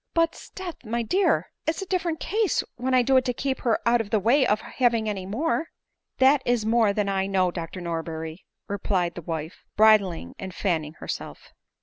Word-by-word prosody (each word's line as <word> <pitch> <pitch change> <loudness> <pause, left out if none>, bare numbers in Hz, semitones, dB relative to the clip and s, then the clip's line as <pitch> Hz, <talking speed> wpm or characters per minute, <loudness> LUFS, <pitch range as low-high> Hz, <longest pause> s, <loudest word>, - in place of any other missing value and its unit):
" - - -58
But, 330 0 +3
sdeath, 365 -6 -9
my 235 +1 -2
dear, 375 - +1 0.2
it 315 - +2
is 390 - -4
a - - -7
different 350 -4 -1
case, 430 -1 +1
when 255 +1 0
I 250 - +5
do 265 +2 +4
it 260 - +3
to 250 -2 -1
keep 265 0 -2
her 230 -3 +2
out 235 0 +4
o£ 210 - -7
the 215 - +2
way 250 +6 +3
of 210 - +2
having 235 -3 +1
any 195 -3 -3
more." 315 +9 -1 0.2
" - - -57
That 270 +2 +5
is 240 -3 +1
more 225 -2 +3
thah 210 +1 0
I 195 -1 0
know, 185 -2 +2
Dr 170 +1 -6
Norberry," 165 -1 -4 0.3
replied 185 -3 -1
the 175 - -7
wife, 160 0 -5
bridling 200 - +4
and 190 -1 -7
fanning 160 -6 -1
herself. - - -7
220 Hz, 210 wpm, -25 LUFS, 185-260 Hz, 0.3 s, I